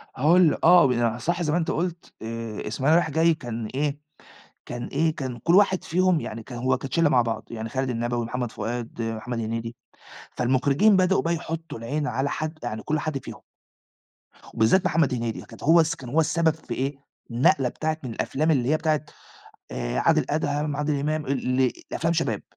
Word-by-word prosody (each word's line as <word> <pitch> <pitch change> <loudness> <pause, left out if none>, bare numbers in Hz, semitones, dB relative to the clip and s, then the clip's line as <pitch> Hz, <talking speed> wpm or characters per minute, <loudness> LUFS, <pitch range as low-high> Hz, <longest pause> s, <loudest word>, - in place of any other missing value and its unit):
هاقول 160 +7 +4
ل - - -2
آه، 175 +1 +7
ب 120 -2 +1
صح 170 +7 -1
زي 155 - 0
ما 160 - +2
أنت 165 - 0
قُلت 170 +1 -3
آآ، 115 -1 -5
إسماعيلية 135 +8 +2
رايح 160 - -1
جاي 165 +3 +4
كان 120 -7 -5
إيه، 145 +1 -1 0.7
كان 120 0 -5
إيه، 160 +2 0
كان 130 -4 -5
كلّ 170 +9 +3
واحد 195 -2 +4
فيهم 185 0 +2
يعني 110 +1 -6
كان 120 - -8
هو 130 +2 +1
كانت 135 -1 -7
شلّه 165 -3 +4
مع 125 -4 +4
بعض 115 -1 -4
يعني 115 0 -5
خالد 130 +2 -2
النبوي، 120 0 -1
محمد 120 0 -3
فؤاد، 120 0 -5
محمد 115 +1 -3
هنيدي، 115 +1 -4 0.6
فالمخرجين 135 - +3
بدأوا 185 +1 +3
بقى 170 - +1
يحطّوا 165 -2 -6
العين 145 +6 -2
على 135 +3 -1
حَد 155 +1 -4
يعني 110 -2 -4
كلّ 155 0 0
حد 155 -1 -2
فيهم - - -9 1.1
وبالذات 115 +13 +3
محمد 160 -6 +2
هنيدي، 115 -2 -3
كانت - - -13
هو 165 +3 +6
الس 160 -1 +2
كان 125 - -10
هو 150 +6 +2
السبب 160 0 +2
في 155 -6 -7
إيه، 135 +3 -2 0.4
النقلة 125 +2 +3
بتاعة 155 +4 -2
من 125 - -5
الأفلام، 155 +7 0
اللي 130 -4 +1
هي 155 - +3
بتاعة 155 -2 0 0.7
آآ، - - -3
عادل 160 -3 +3
أدهم، 145 -1 -1
عادل 150 -1 -1
إمام، 155 +1 -1
ال 130 -1 0
إ - - -7 0.2
لأفلام 165 +1 0
شباب. 160 -11 -1
140 Hz, 195 wpm, -25 LUFS, 120-160 Hz, 1.1 s, آه